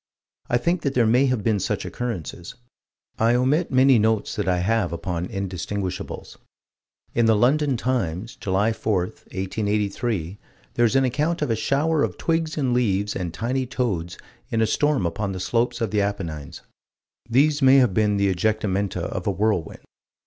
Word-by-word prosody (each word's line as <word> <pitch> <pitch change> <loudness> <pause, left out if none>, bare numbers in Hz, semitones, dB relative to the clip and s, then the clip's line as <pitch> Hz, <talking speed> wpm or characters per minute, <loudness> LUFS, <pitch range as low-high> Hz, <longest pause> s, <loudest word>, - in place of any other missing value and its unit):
I 120 - +3
think 170 +8 0
that 140 -2 -2
there 120 -2 +4
may 125 +5 +4
have 125 -5 0
been 105 -2 +1
such - - -2
occurrences. 90 - -5 0.6
I 115 +2 +3
omit 140 +7 +2
many 130 -2 +5
notes 110 0 +1
that 105 - -2
I 90 -1 +2
have 100 0 +1
upon 85 +1 -3
indistinguishables. 95 -1 -5 0.7
In 115 -1 +3
the 110 - +5
London 135 +4 +2
Times, 115 -5 -2
July 100 +4 0
4, 105 -4 0
1883, 100 0 -3 0.3
there 120 - +3
is 115 - +1
an 135 0 +4
account 150 +6 0
of 130 - -1
a - - +2
shower 150 +6 +1
of - - -1
twigs 165 -1 -1
and 130 -4 +1
leaves 105 -4 +1
and 90 -3 -3
tiny 125 +7 -2
toads 95 -10 -2 0.3
in 115 - -1
a 110 - +4
storm 145 -1 +1
upon 95 +4 -2
the 95 - -5
slopes 120 +4 0
of 115 - -1
the 105 -1 +2
Apennines. 85 -8 -4 0.7
These 145 +5 +3
may 135 0 +7
have 125 -7 +4
been 105 0 +2
the 100 -1 +2
ejectamenta 100 -2 -1
of 90 - -4
a - - +3
whirlwind. 100 -4 -1
110 Hz, 170 wpm, -23 LUFS, 95-130 Hz, 0.7 s, may